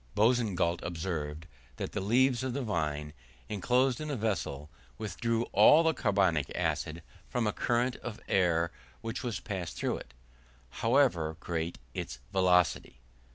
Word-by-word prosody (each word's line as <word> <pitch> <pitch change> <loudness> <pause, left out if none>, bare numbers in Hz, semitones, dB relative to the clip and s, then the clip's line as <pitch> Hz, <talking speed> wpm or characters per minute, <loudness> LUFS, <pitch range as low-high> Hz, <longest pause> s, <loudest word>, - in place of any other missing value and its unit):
Boussingault 105 -7 +2
observed, 80 -3 -4 0.3
that - - -4
the - - -2
leaves 125 +5 +3
of 130 -2 -2
the 140 +1 -2
vine, 75 -8 -2 0.4
inclosed 125 +6 +1
in 155 - -4
a 145 - -1
vessel, 100 - -2 0.3
withdrew 115 +2 -1
all 150 +11 +7
the 160 0 +3
carbonic 95 - +1
acid 80 +1 -1 0.3
from 125 -2 0
a 105 - +1
current 120 +1 0
of 115 -2 -7
air 85 -3 +2 0.3
which 115 0 -4
was 120 -5 -3
passed 95 -5 -5
through - - -1
it, - - -12 0.6
however 115 - +2
great 85 -1 -3 0.2
its 65 - -5 0.2
velocity. 90 -7 +2
100 Hz, 140 wpm, -31 LUFS, 85-120 Hz, 0.6 s, all